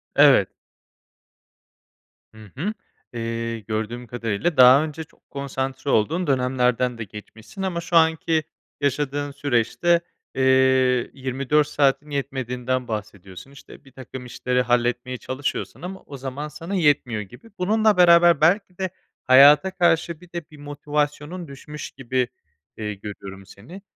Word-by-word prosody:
Evet. - - +6 1.8
Hı 110 -2 -14
hı. 195 +10 -2 0.4
Eee, 115 0 -3
gördüğüm 110 +3 -4
kadarıyla 115 - -2
daha 130 +3 +8
önce 155 0 -6
çok 155 - -26
konsantre 135 0 -4
olduğun 160 +11 +1
dönemlerden 125 -2 +1
de 115 - -4
geçmişsin 110 - -11
ama 175 -3 -2
şu 175 0 -4
anki 160 -1 +3 0.4
yaşadığın 145 +1 -1
süreçte, 145 +5 +1 0.3
eee, 135 - -1 0.7
24 135 +3 0
saatin 145 +1 +1
yetmediğinden 130 -2 -3
bahsediyorsun, 105 +1 -7
işte, 140 0 -15
birtakım 130 -1 -10
işleri 125 0 -1
halletmeye 125 +1 0
çalışıyorsun 130 +5 -4
ama 190 +2 -7
o 140 - -9
zaman 135 +3 -5
sana 165 +5 -6
yetmiyor 145 - +2
gibi. 120 - -13
Bununla 215 +2 +2
beraber 170 -2 +6
belki 180 +3 +2
de, 190 -1 -2 0.4
hayata 145 +8 +7
karşı 170 -3 +1
bir 180 -1 -17
de 170 -1 -5
bir 150 - -14
motivasyonun 150 +3 -3
düşmüş 150 +2 -9
gibi, 130 -1 -2 0.5
eee, 105 -1 -4
görüyorum 100 -1 -9
seni. 125 - -13
135 Hz, 125 wpm, -23 LUFS, 120-160 Hz, 1.8 s, daha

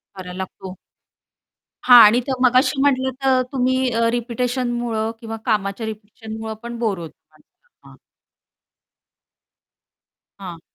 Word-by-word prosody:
करायला 180 -1 -9
लागतो. 190 0 -7 1.1
हां. 245 -1 +9
आणि 225 +4 +4
तर 270 - -1
मगाशी 255 +2 +3
म्हंटलं 260 -2 +1
तर 260 -1 +3
तुम्ही 260 -1 0
अ, 230 0 +1
रिपिटिशनमुळं 240 -2 -2
किंवा 225 0 -6
कामाच्या 210 -1 -1
रिपिटिशनमुळं 220 +1 -8
पण 235 0 -6
बोर 215 -5 -1
होतो 165 -2 -9 0.2
माणसाला. 485 -1 -25
हां - - -16 2.4
हां. 180 -4 -8
230 Hz, 110 wpm, -20 LUFS, 210-250 Hz, 2.4 s, हां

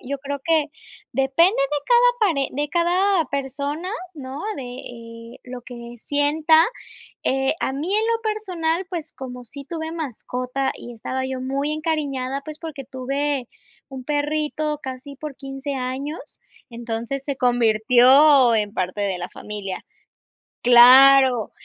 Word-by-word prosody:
yo 280 +2 -4
creo 285 +1 -5
que 320 -3 +2 0.5
depende 270 +7 +3
de 275 +2 0
cada - - +5 0.2
pare 275 -3 -1
de 290 +2 -2
cada 355 +1 +2
persona, 280 +5 -3 0.3
¿no?, 270 -1 -7 0.2
de 270 - -5
eh 230 -2 -10
lo 250 -1 -8
que 240 -1 -10
sienta, 305 +4 +3 0.6
eh, 270 +1 +1
a 265 - -1
mí 320 +8 -2
en 435 +1 +2
lo 460 0 0
personal, 375 -6 -2
pues, 330 -4 -5
como 250 -2 -8
sí 280 +4 -11
tuve 320 +1 -5
mascota 265 -3 -3
y 240 - -9
estaba 260 +3 -4
yo 260 -1 -4
muy 275 +3 -2
encariñada, 280 -4 -2
pues, 305 +1 -9
porque 290 -5 -7
tuve 275 0 -2 0.4
un 265 -2 -8
perrito 300 0 -1
casi 260 +2 -8
por 300 -3 -7
15, 270 +1 -6
años, 265 +4 -5 0.3
entonces 235 +3 -4
se 280 -2 -2
convirtió 245 +2 +5
en 210 -1 -1
parte 185 +1 -2
de 195 -3 -1
la 175 - -5
familia. 200 -3 -7 0.8
Claro. 250 0 +7
275 Hz, 140 wpm, -22 LUFS, 250-305 Hz, 0.8 s, Claro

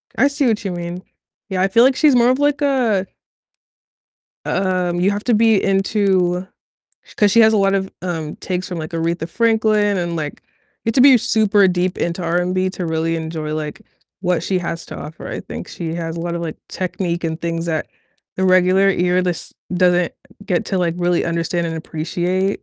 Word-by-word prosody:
I 275 - +4
see 280 -1 0
what 215 -3 0
you 195 - -2
mean. 175 +1 -5 0.5
Yeah, 185 -1 -1
I 190 - +4
feel, 230 +4 +4
like, 260 +1 +4
she's 295 -4 +4
more 240 0 +5
of, 255 +2 +2
like, 290 0 +1
a 240 -9 +1 1.4
um, 180 -2 0
you 190 +3 +3
have 205 +1 -3
to 245 - +2
be 220 -2 +4
into 195 -2 +1 0.7
'cause 205 -1 +4
she 230 - +6
has 220 0 +6
a - - +3
lot 195 0 +3
of, 190 0 -1
um, 160 -4 -4
takes 185 0 -4
from, 175 -2 -5
like, 155 +1 -5
Aretha 165 0 -2
Franklin, 215 -2 +2
and, 170 -1 -2
like, 150 -2 -3 0.5
you 225 - +1
have - - -5
to - - +4
be 265 -1 +8
super 215 -3 +3
deep 180 0 -1
into 170 +2 -2
R&B 180 +2 0
to 185 -2 -5
really 165 +1 -1
enjoy, 160 -1 -4
like, 150 -1 -5 0.4
what 180 -3 +1
she 185 +1 0
has 170 -1 -5
to - - -8
offer. 150 +2 -8
I - - -4
think - - -8
she 165 -2 -5
has 165 -1 -4
a - - -4
lot 170 0 -3
of, 170 - -4
like, 160 -2 -5
technique 175 -2 -3
and 160 0 -3
things 165 0 -3
that 160 -2 -2 0.5
the 190 - 0
regular 185 +1 +4
ear 180 0 +2
lis 180 -2 -3 0.2
doesn't 180 -1 +2 0.3
get 180 +2 0
to, 190 - -1
like, 170 -2 0
really 175 -1 +1
understand 170 +1 -1
and 165 - -3
appreciate. 175 +5 -2
180 Hz, 200 wpm, -19 LUFS, 170-205 Hz, 1.4 s, be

